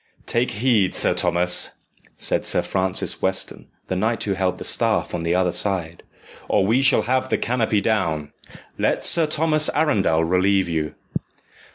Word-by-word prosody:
"Take 120 Hz, +2 st, 0 dB
heed, 105 Hz, -4 st, +1 dB
Sir -, -, +4 dB
Thomas," 90 Hz, +1 st, +2 dB, 0.4 s
said -, -, +2 dB
Sir -, -, +3 dB
Francis 95 Hz, -1 st, -2 dB
Weston, 95 Hz, 0 st, 0 dB, 0.2 s
the 95 Hz, -, -4 dB
knight 110 Hz, +4 st, -1 dB
who 100 Hz, -, -1 dB
held 95 Hz, -1 st, -2 dB
the -, -, -8 dB
staff -, -, +1 dB
on 85 Hz, -, -3 dB
the 85 Hz, +1 st, -1 dB
other 90 Hz, -1 st, +1 dB
side, 85 Hz, -3 st, -1 dB, 0.5 s
"or 95 Hz, -, +2 dB
we 115 Hz, +6 st, +2 dB
shall 135 Hz, -, +3 dB
have 130 Hz, +1 st, -1 dB
the -, -, +1 dB
canopy 115 Hz, -4 st, -1 dB
down. 80 Hz, -9 st, -1 dB, 0.5 s
Let -, -, 0 dB
Sir 165 Hz, -2 st, +3 dB
Thomas 155 Hz, 0 st, +1 dB
Arundel 105 Hz, -, +1 dB
relieve 95 Hz, +2 st, +1 dB
you." 80 Hz, -3 st, -3 dB
95 Hz, 160 wpm, -21 LUFS, 90-120 Hz, 0.5 s, Sir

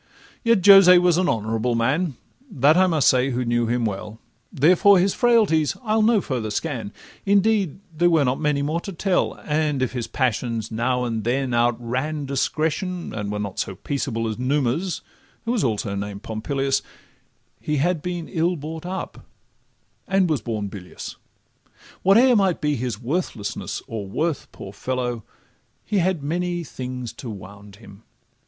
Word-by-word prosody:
Yet 230 Hz, -6 st, +3 dB
Jose 195 Hz, -3 st, +9 dB
was 175 Hz, -1 st, +3 dB
an 185 Hz, -, +2 dB
honourable 115 Hz, +2 st, 0 dB
man, 135 Hz, +7 st, 0 dB, 0.3 s
That 150 Hz, -, +4 dB
I 185 Hz, +1 st, +5 dB
must 160 Hz, -5 st, +2 dB
say 130 Hz, +1 st, +4 dB
who 125 Hz, -1 st, -1 dB
knew 120 Hz, 0 st, +1 dB
him 120 Hz, 0 st, 0 dB
very 100 Hz, -3 st, -1 dB
well; 105 Hz, +2 st, -10 dB, 0.3 s
Therefore 180 Hz, +7 st, +5 dB
his 185 Hz, +2 st, +2 dB
frailties 215 Hz, -11 st, +3 dB
I'll 220 Hz, -1 st, +2 dB
no 215 Hz, -1 st, +4 dB
further 120 Hz, -8 st, -3 dB
scan 115 Hz, -2 st, -3 dB, 0.3 s
Indeed 200 Hz, -4 st, +2 dB, 0.2 s
there 175 Hz, +2 st, +3 dB
were 160 Hz, -4 st, +3 dB
not 125 Hz, +1 st, 0 dB
many 150 Hz, -2 st, 0 dB
more 155 Hz, +4 st, -1 dB
to 195 Hz, -, -7 dB
tell; 180 Hz, +2 st, 0 dB
And 150 Hz, -3 st, 0 dB
if 130 Hz, -, -1 dB
his 120 Hz, -3 st, -4 dB
passions 115 Hz, -3 st, -1 dB
now 125 Hz, +3 st, 0 dB
and 115 Hz, -3 st, -2 dB
then 125 Hz, +2 st, 0 dB
outran 120 Hz, +5 st, 0 dB
Discretion, 160 Hz, +6 st, -2 dB
and 105 Hz, -2 st, -4 dB
were 105 Hz, -, -2 dB
not 100 Hz, -2 st, -4 dB
so 95 Hz, -, -3 dB
peaceable 115 Hz, 0 st, -3 dB
As 110 Hz, +1 st, -4 dB
Numa's 140 Hz, +6 st, 0 dB, 0.4 s
(who 230 Hz, -, 0 dB
was 240 Hz, -4 st, 0 dB
also 105 Hz, -4 st, -1 dB
named 100 Hz, 0 st, -5 dB
Pompilius), 135 Hz, +5 st, -1 dB, 0.8 s
He 150 Hz, -, -2 dB
had 170 Hz, +3 st, +1 dB
been 175 Hz, -1 st, -4 dB
ill 175 Hz, 0 st, 0 dB
brought 160 Hz, +2 st, -7 dB
up, 190 Hz, +1 st, -6 dB, 0.8 s
and 195 Hz, -1 st, +2 dB
was 155 Hz, -7 st, 0 dB
born 105 Hz, -2 st, -3 dB
bilious. 95 Hz, -2 st, -8 dB, 0.9 s
Whate'er 235 Hz, +7 st, +5 dB
might 195 Hz, -5 st, +2 dB
be 150 Hz, -1 st, 0 dB
his 120 Hz, -4 st, -3 dB
worthlessness 125 Hz, -, -3 dB
or 105 Hz, -3 st, -5 dB
worth, 155 Hz, -, -2 dB
Poor 95 Hz, -, -10 dB
fellow! 125 Hz, 0 st, -3 dB, 0.6 s
he 205 Hz, -2 st, 0 dB
had 175 Hz, -4 st, 0 dB
many 175 Hz, +3 st, -2 dB
things 125 Hz, -4 st, -6 dB
to 125 Hz, -, -8 dB
wound 100 Hz, 0 st, -10 dB
him. 100 Hz, -1 st, -15 dB
140 Hz, 160 wpm, -23 LUFS, 115-175 Hz, 0.9 s, Jose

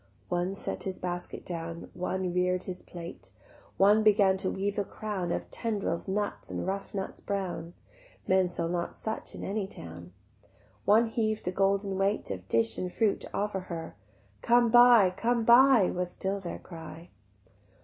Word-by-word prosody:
One 180 Hz, +2 st, -1 dB
set -, -, -5 dB
his 190 Hz, -1 st, -4 dB
basket 175 Hz, -1 st, -5 dB
down, 165 Hz, -1 st, -6 dB
One 185 Hz, 0 st, -2 dB
rear'd 180 Hz, 0 st, +1 dB
his 185 Hz, -1 st, -6 dB
plate; 170 Hz, -1 st, -9 dB, 0.5 s
One 205 Hz, +3 st, +5 dB
began 205 Hz, -3 st, +5 dB
to 190 Hz, 0 st, 0 dB
weave 200 Hz, +1 st, -2 dB
a -, -, +1 dB
crown 195 Hz, -4 st, -4 dB
Of -, -, -3 dB
tendrils, 205 Hz, -7 st, -2 dB
leaves, 205 Hz, +2 st, -2 dB
and -, -, -3 dB
rough 195 Hz, +1 st, -4 dB
nuts 190 Hz, -1 st, -4 dB
brown 185 Hz, -3 st, -4 dB, 0.5 s
(Men 185 Hz, -1 st, +3 dB
sell 170 Hz, -1 st, -3 dB
not 170 Hz, 0 st, -2 dB
such 220 Hz, 0 st, -5 dB
in -, -, -7 dB
any 200 Hz, 0 st, -2 dB
town); 85 Hz, -, -10 dB, 0.7 s
One 220 Hz, +3 st, +5 dB
heav'd 220 Hz, -2 st, -1 dB
the 180 Hz, -, 0 dB
golden 195 Hz, 0 st, +1 dB
weight 195 Hz, -, 0 dB
Of 95 Hz, -1 st, -6 dB
dish 115 Hz, 0 st, +1 dB
and 180 Hz, -1 st, -3 dB
fruit 215 Hz, 0 st, +1 dB
to -, -, -9 dB
offer 200 Hz, -1 st, -1 dB
her: 170 Hz, -, -7 dB, 0.5 s
"Come 240 Hz, -1 st, +4 dB
buy, 240 Hz, -5 st, +7 dB
come 230 Hz, +3 st, +1 dB
buy," 240 Hz, -3 st, +7 dB
was 180 Hz, 0 st, -2 dB
still 195 Hz, +2 st, -3 dB
their 180 Hz, -3 st, -5 dB
cry. 165 Hz, 0 st, -11 dB
190 Hz, 165 wpm, -29 LUFS, 175-210 Hz, 0.7 s, buy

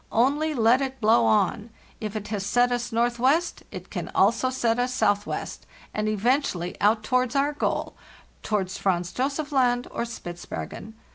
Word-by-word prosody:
Only 290 Hz, +6 st, +2 dB
let 235 Hz, +2 st, +4 dB
it 265 Hz, -1 st, -3 dB
blow 210 Hz, -, +4 dB
on; 205 Hz, -, +1 dB, 0.3 s
if 215 Hz, -1 st, -5 dB
it 210 Hz, -1 st, -5 dB
has 205 Hz, -3 st, -2 dB
set 245 Hz, +5 st, +2 dB
us 245 Hz, 0 st, -2 dB
northwest 245 Hz, +8 st, +1 dB
it -, -, -9 dB
can -, -, -4 dB
also 230 Hz, +6 st, +3 dB
set 240 Hz, -2 st, 0 dB
us 250 Hz, +1 st, 0 dB
southwest, 205 Hz, -4 st, -1 dB, 0.3 s
and 215 Hz, 0 st, -1 dB
eventually 215 Hz, -5 st, 0 dB
out 215 Hz, +1 st, +3 dB
towards 255 Hz, +2 st, +1 dB
our 280 Hz, +2 st, +2 dB
goal—towards 205 Hz, -8 st, -4 dB
Franz 175 Hz, -2 st, 0 dB
Josef 280 Hz, +3 st, -2 dB
Land 245 Hz, -3 st, +2 dB
or -, -, -2 dB
Spitzbergen. 220 Hz, +1 st, -7 dB
235 Hz, 150 wpm, -25 LUFS, 210-255 Hz, 0.3 s, let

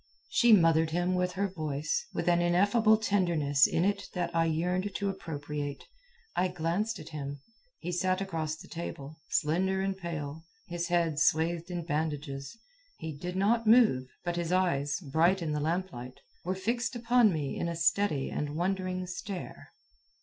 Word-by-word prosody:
She 240 Hz, -1 st, +4 dB
mothered 165 Hz, -5 st, +5 dB
him 175 Hz, +3 st, 0 dB
with 180 Hz, 0 st, 0 dB
her 200 Hz, +2 st, 0 dB
voice, 155 Hz, -, -2 dB
with 170 Hz, -, -3 dB
an 175 Hz, 0 st, +4 dB
ineffable 205 Hz, +6 st, +4 dB
tenderness 170 Hz, -10 st, +3 dB
in 170 Hz, -, +1 dB
it 200 Hz, 0 st, 0 dB
that 175 Hz, -1 st, -2 dB
I 165 Hz, 0 st, +3 dB
yearned 180 Hz, +5 st, -1 dB
to 200 Hz, -1 st, -1 dB
appropriate. 145 Hz, -5 st, -5 dB, 0.5 s
I 185 Hz, -, +2 dB
glanced 180 Hz, +5 st, -1 dB
at 155 Hz, +1 st, -10 dB
him. 145 Hz, -2 st, -5 dB, 0.4 s
He 180 Hz, -, -5 dB
sat 185 Hz, +1 st, +1 dB
across 160 Hz, -5 st, -2 dB
the 185 Hz, +4 st, -13 dB
table, 160 Hz, -2 st, -7 dB
slender 190 Hz, +5 st, +1 dB
and 195 Hz, 0 st, -1 dB
pale, 160 Hz, -4 st, -5 dB, 0.2 s
his 175 Hz, 0 st, -3 dB
head 170 Hz, -3 st, +1 dB
swathed 165 Hz, +2 st, +2 dB
in 175 Hz, -2 st, -4 dB
bandages. 150 Hz, 0 st, -3 dB, 0.4 s
He 160 Hz, -2 st, -6 dB
did 180 Hz, +5 st, -5 dB
not 220 Hz, +4 st, +2 dB
move, 215 Hz, -, +5 dB, 0.2 s
but 175 Hz, 0 st, -1 dB
his 170 Hz, 0 st, -2 dB
eyes, 170 Hz, -6 st, +1 dB
bright 165 Hz, +5 st, +2 dB
in 165 Hz, -3 st, -2 dB
the 150 Hz, -, 0 dB
lamplight, 150 Hz, -6 st, -3 dB, 0.3 s
were 185 Hz, +2 st, -1 dB
fixed 235 Hz, +6 st, -1 dB
upon 240 Hz, -2 st, +4 dB
me 150 Hz, -5 st, -2 dB
in 170 Hz, -, -2 dB
a 170 Hz, -, -3 dB
steady 165 Hz, -4 st, +1 dB
and 150 Hz, 0 st, -3 dB
wondering 185 Hz, +1 st, -1 dB
stare. 180 Hz, +1 st, -7 dB
175 Hz, 165 wpm, -30 LUFS, 155-190 Hz, 0.5 s, mothered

